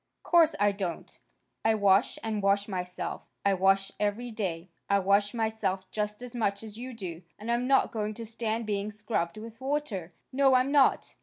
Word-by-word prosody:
"Course 330 Hz, -2 st, +5 dB
I 205 Hz, 0 st, +4 dB
don't. 190 Hz, -4 st, -5 dB, 0.4 s
I 225 Hz, 0 st, +4 dB
wash 200 Hz, 0 st, +3 dB
and 215 Hz, -2 st, -1 dB
wash 200 Hz, +1 st, +2 dB
myself. 180 Hz, -2 st, -4 dB, 0.2 s
I 200 Hz, -, +4 dB
wash 195 Hz, +1 st, +3 dB
every 210 Hz, +4 st, -1 dB
day. 185 Hz, -5 st, -4 dB, 0.2 s
I 200 Hz, -, +5 dB
wash 200 Hz, +1 st, +3 dB
myself 220 Hz, -5 st, -2 dB
just 210 Hz, +2 st, -3 dB
as 250 Hz, -1 st, -8 dB
much 200 Hz, -3 st, 0 dB
as 215 Hz, -2 st, -8 dB
you 250 Hz, +3 st, -6 dB
do. 180 Hz, -6 st, -6 dB, 0.2 s
And 220 Hz, +3 st, -4 dB
I'm 240 Hz, +1 st, +1 dB
not 270 Hz, 0 st, +4 dB
going 215 Hz, -1 st, -2 dB
to 230 Hz, -, -6 dB
stand 225 Hz, 0 st, -2 dB
being 205 Hz, -1 st, -1 dB
scrubbed 210 Hz, -4 st, -2 dB
with 230 Hz, +3 st, -10 dB
water. 265 Hz, -, -2 dB, 0.2 s
No, 270 Hz, 0 st, +5 dB
I'm 255 Hz, +2 st, +3 dB
not." 285 Hz, -2 st, +3 dB
210 Hz, 180 wpm, -29 LUFS, 195-230 Hz, 0.4 s, Course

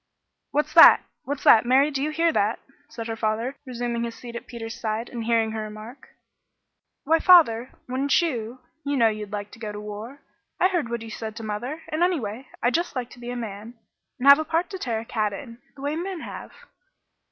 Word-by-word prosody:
"What's 295 Hz, +1 st, -1 dB
that? -, -, +9 dB, 0.2 s
What's 285 Hz, +1 st, -4 dB
that? 220 Hz, -, +7 dB
Mary, 265 Hz, +5 st, +4 dB
do 275 Hz, -1 st, -2 dB
you 300 Hz, -, 0 dB
hear 330 Hz, +1 st, +1 dB
that?" 210 Hz, +3 st, +1 dB, 0.3 s
said 230 Hz, -1 st, -7 dB
her 225 Hz, 0 st, -3 dB
father, 225 Hz, +4 st, -1 dB
resuming 240 Hz, -1 st, -3 dB
his 230 Hz, -1 st, -4 dB
seat 235 Hz, -1 st, -10 dB
at 235 Hz, -, -7 dB
Peter's 225 Hz, -1 st, -7 dB
side, 220 Hz, +1 st, -2 dB
and 235 Hz, -2 st, -5 dB
hearing 225 Hz, -1 st, +2 dB
her 220 Hz, 0 st, -4 dB
remark. 215 Hz, +4 st, -9 dB, 0.9 s
"Why, 325 Hz, +3 st, +3 dB
father, 260 Hz, -10 st, +6 dB, 0.2 s
wouldn't 265 Hz, +2 st, +2 dB
you? 250 Hz, -7 st, -3 dB, 0.2 s
You 285 Hz, 0 st, -1 dB
know 230 Hz, -3 st, +5 dB
you'd 210 Hz, -1 st, -6 dB
like 205 Hz, -1 st, -5 dB
to -, -, -14 dB
go 215 Hz, -2 st, -5 dB
to 210 Hz, -, -7 dB
war. 210 Hz, +6 st, -8 dB, 0.4 s
I 370 Hz, -, +4 dB
heard 345 Hz, -10 st, -1 dB
what 235 Hz, -1 st, -3 dB
you 225 Hz, -, -9 dB
said 220 Hz, 0 st, -6 dB
to 230 Hz, -, -7 dB
mother, 240 Hz, +9 st, -4 dB
and, 310 Hz, +2 st, -2 dB
anyway 265 Hz, -, -1 dB, 0.2 s
I'd 245 Hz, -, +2 dB
just 340 Hz, -2 st, -1 dB
like 250 Hz, -2 st, -4 dB
to 245 Hz, -, -13 dB
be 240 Hz, 0 st, -7 dB
a 245 Hz, -, -4 dB
man 225 Hz, 0 st, -7 dB, 0.4 s
and 260 Hz, -, 0 dB
'Have 280 Hz, +2 st, +10 dB
a -, -, 0 dB
part 330 Hz, +4 st, -1 dB
to 380 Hz, -, -6 dB
tear 230 Hz, -6 st, -2 dB
a -, -, -11 dB
cat 215 Hz, -3 st, -1 dB
in,' 230 Hz, +2 st, -9 dB, 0.2 s
the 275 Hz, -, -11 dB
way 290 Hz, +2 st, -1 dB
men 355 Hz, +1 st, -4 dB
have." -, -, -8 dB
240 Hz, 220 wpm, -24 LUFS, 220-285 Hz, 0.9 s, Have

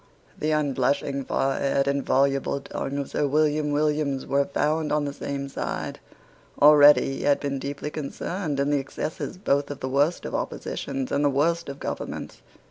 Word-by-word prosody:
The 155 Hz, -, 0 dB
unblushing 140 Hz, -2 st, 0 dB
forehead 135 Hz, 0 st, 0 dB
and 140 Hz, 0 st, +1 dB
voluble 135 Hz, 0 st, +1 dB
tongue 140 Hz, 0 st, -4 dB
of 140 Hz, -1 st, -4 dB
Sir 145 Hz, -, +1 dB
William 150 Hz, +1 st, +2 dB
Williams 150 Hz, -2 st, 0 dB
were 140 Hz, 0 st, +2 dB
found 155 Hz, +2 st, 0 dB
on 150 Hz, -1 st, +1 dB
the 140 Hz, -, -3 dB
same 140 Hz, -1 st, -4 dB
side. 135 Hz, -, -4 dB, 0.6 s
Already 145 Hz, -2 st, +7 dB
he -, -, -6 dB
had 145 Hz, -1 st, +3 dB
been 140 Hz, -1 st, -2 dB
deeply 140 Hz, +2 st, -5 dB
concerned 155 Hz, +1 st, -4 dB
in 140 Hz, +1 st, +1 dB
the 145 Hz, -, +3 dB
excesses 135 Hz, +5 st, -5 dB
both 140 Hz, -7 st, 0 dB
of 145 Hz, -, -6 dB
the 130 Hz, -, -3 dB
worst 145 Hz, +6 st, +1 dB
of -, -, -5 dB
oppositions 135 Hz, -2 st, -3 dB
and 145 Hz, -, +1 dB
of 145 Hz, -, +3 dB
the 135 Hz, -, -3 dB
worst 170 Hz, +2 st, +1 dB
of 140 Hz, 0 st, -7 dB
governments. -, -, -5 dB
140 Hz, 175 wpm, -25 LUFS, 140-150 Hz, 0.6 s, Already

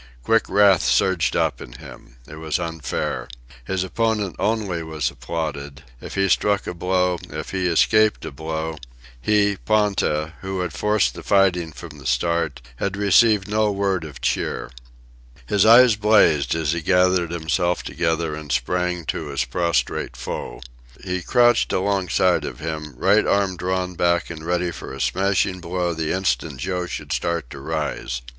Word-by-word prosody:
Quick -, -, +2 dB
wrath 100 Hz, -3 st, +5 dB
surged 95 Hz, -5 st, +2 dB
up -, -, 0 dB
in -, -, -10 dB
him. -, -, -13 dB
It 75 Hz, -, -10 dB
was 80 Hz, 0 st, -2 dB
unfair. 80 Hz, -8 st, -3 dB, 0.4 s
His 95 Hz, +3 st, -1 dB
opponent 105 Hz, -1 st, -1 dB
only 105 Hz, -6 st, -1 dB
was 80 Hz, -2 st, -2 dB
applauded 70 Hz, -4 st, -5 dB, 0.2 s
if -, -, -8 dB
he 95 Hz, 0 st, +2 dB
struck 100 Hz, +2 st, +1 dB
a -, -, -4 dB
blow, 90 Hz, 0 st, 0 dB
if 80 Hz, +1 st, -6 dB
he 95 Hz, -2 st, -1 dB
escaped 110 Hz, +5 st, +3 dB
a -, -, -5 dB
blow; 80 Hz, +2 st, -4 dB, 0.4 s
he, 100 Hz, -, +2 dB
Ponta, 100 Hz, -8 st, +1 dB
who 95 Hz, 0 st, -3 dB
had 90 Hz, -2 st, -3 dB
forced 105 Hz, -1 st, +1 dB
the -, -, -9 dB
fighting 90 Hz, -5 st, +2 dB
from 75 Hz, -1 st, -11 dB
the 65 Hz, -, -7 dB
start, 70 Hz, -2 st, 0 dB
had 100 Hz, +5 st, -2 dB
received 105 Hz, 0 st, +4 dB
no 105 Hz, 0 st, +1 dB
word 100 Hz, -3 st, -1 dB
of 75 Hz, -3 st, -10 dB
cheer. 65 Hz, -, -2 dB, 0.7 s
His 100 Hz, -, +2 dB
eyes 120 Hz, 0 st, +8 dB
blazed 105 Hz, -9 st, +3 dB
as 80 Hz, -2 st, 0 dB
he 85 Hz, 0 st, -2 dB
gathered 90 Hz, 0 st, +2 dB
himself 85 Hz, +1 st, -1 dB
together 80 Hz, -1 st, -1 dB
and 75 Hz, -1 st, -7 dB
sprang 90 Hz, +7 st, -1 dB
to 80 Hz, -, -3 dB
his 70 Hz, -2 st, -1 dB
prostrate 85 Hz, -3 st, -1 dB
foe. -, -, -6 dB, 0.4 s
He 90 Hz, 0 st, -2 dB
crouched 120 Hz, +4 st, +3 dB
alongside 95 Hz, -1 st, +1 dB
of 60 Hz, -, -6 dB
him, 75 Hz, -3 st, -5 dB
right 100 Hz, +8 st, +3 dB
arm 100 Hz, -2 st, +1 dB
drawn 90 Hz, +1 st, -2 dB
back 85 Hz, -1 st, +1 dB
and 80 Hz, -2 st, -8 dB
ready 90 Hz, +1 st, -1 dB
for -, -, -8 dB
a 70 Hz, -, -8 dB
smashing 95 Hz, +1 st, 0 dB
blow 90 Hz, 0 st, -2 dB
the 80 Hz, -1 st, -2 dB
instant 85 Hz, -6 st, -1 dB
Joe 90 Hz, +6 st, -3 dB
should -, -, -5 dB
start 85 Hz, -7 st, -2 dB
to 70 Hz, -, -8 dB
rise. 75 Hz, -5 st, -3 dB
90 Hz, 160 wpm, -22 LUFS, 80-95 Hz, 0.7 s, eyes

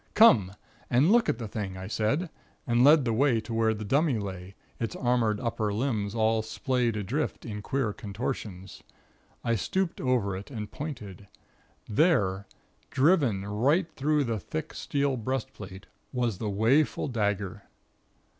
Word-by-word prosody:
"Come 110 Hz, -, +6 dB, 0.4 s
and 135 Hz, +9 st, +4 dB
look 235 Hz, +1 st, +4 dB
at -, -, +1 dB
the 115 Hz, -2 st, -5 dB
thing," 100 Hz, -3 st, -5 dB
I 95 Hz, -, -6 dB
said, 135 Hz, -, -1 dB, 0.3 s
and 120 Hz, -2 st, +3 dB
led 145 Hz, 0 st, +6 dB
the 115 Hz, -, +1 dB
way 125 Hz, 0 st, +3 dB
to 115 Hz, +1 st, -7 dB
where 115 Hz, 0 st, +2 dB
the 105 Hz, 0 st, -6 dB
dummy 140 Hz, +3 st, +2 dB
lay, 95 Hz, -2 st, -6 dB, 0.2 s
its 115 Hz, -3 st, -3 dB
armored 120 Hz, -4 st, +1 dB
upper 110 Hz, -3 st, -1 dB
limbs 105 Hz, -2 st, -1 dB
all 110 Hz, 0 st, +2 dB
splayed 115 Hz, +1 st, -1 dB
adrift 120 Hz, +10 st, -2 dB
in 105 Hz, -3 st, -5 dB
queer 115 Hz, -1 st, -1 dB
contortions. 100 Hz, -4 st, -5 dB, 0.6 s
I 115 Hz, -, +1 dB
stooped 180 Hz, -, -1 dB
over 120 Hz, -7 st, +1 dB
it 95 Hz, +2 st, -8 dB
and 105 Hz, -6 st, -6 dB
pointed. 105 Hz, -, -7 dB, 0.6 s
There, 105 Hz, -, +2 dB, 0.4 s
driven 130 Hz, -, +2 dB
right 140 Hz, -, +1 dB
through 150 Hz, +1 st, +1 dB
the 115 Hz, -4 st, -2 dB
thick 155 Hz, -, -5 dB
steel 140 Hz, -2 st, -1 dB
breastplate, 110 Hz, -6 st, -5 dB, 0.3 s
was 120 Hz, -7 st, -1 dB
the 110 Hz, -, -2 dB
'waeful 115 Hz, +11 st, +2 dB
dagger.' 105 Hz, -3 st, -1 dB
115 Hz, 145 wpm, -28 LUFS, 105-135 Hz, 0.6 s, Come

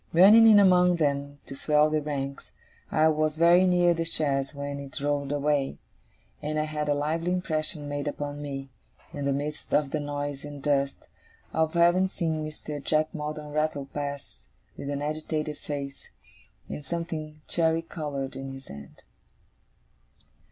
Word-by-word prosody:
Running 210 Hz, +7 st, +8 dB
in 215 Hz, -2 st, +8 dB
among 180 Hz, -2 st, +5 dB
them 140 Hz, -3 st, -1 dB
to 135 Hz, -, -8 dB
swell 150 Hz, +2 st, +3 dB
the 155 Hz, 0 st, +1 dB
ranks, 140 Hz, -2 st, -4 dB, 0.4 s
I 155 Hz, +1 st, +4 dB
was 155 Hz, 0 st, 0 dB
very 175 Hz, +3 st, +6 dB
near 175 Hz, -1 st, +4 dB
the 165 Hz, 0 st, -1 dB
chaise 145 Hz, -4 st, 0 dB
when 140 Hz, 0 st, -4 dB
it 140 Hz, +2 st, -7 dB
rolled 145 Hz, 0 st, -1 dB
away; 145 Hz, -1 st, 0 dB, 0.6 s
and 155 Hz, +1 st, -2 dB
I 155 Hz, -, +2 dB
had 150 Hz, -1 st, -3 dB
a 145 Hz, -, +3 dB
lively 160 Hz, +4 st, -1 dB
impression 155 Hz, -4 st, -1 dB
made 145 Hz, 0 st, -3 dB
upon 145 Hz, 0 st, -4 dB
me, 135 Hz, -2 st, -6 dB, 0.4 s
in 145 Hz, -1 st, -4 dB
the 140 Hz, -, +2 dB
midst 145 Hz, +2 st, -2 dB
of 145 Hz, -2 st, +1 dB
the 155 Hz, -, 0 dB
noise 145 Hz, -1 st, -4 dB
and 145 Hz, -1 st, -8 dB
dust, 140 Hz, -1 st, 0 dB, 0.5 s
of 160 Hz, 0 st, +1 dB
having 175 Hz, +2 st, +4 dB
seen 160 Hz, -4 st, -2 dB
Mr. 150 Hz, -1 st, -6 dB
Jack 155 Hz, +2 st, +1 dB
Maldon 150 Hz, -1 st, -5 dB
rattle 155 Hz, -2 st, -1 dB
past 145 Hz, -1 st, -6 dB, 0.3 s
with 140 Hz, -, -6 dB
an 145 Hz, 0 st, -2 dB
agitated 155 Hz, 0 st, -3 dB
face, 140 Hz, -1 st, -6 dB, 0.6 s
and 150 Hz, -, -6 dB
something 155 Hz, 0 st, -5 dB
cherry 165 Hz, -1 st, +2 dB
coloured 145 Hz, -5 st, -5 dB
in 135 Hz, 0 st, -6 dB
his 135 Hz, 0 st, -11 dB
hand. 70 Hz, 0 st, -11 dB
150 Hz, 160 wpm, -27 LUFS, 140-160 Hz, 0.6 s, Running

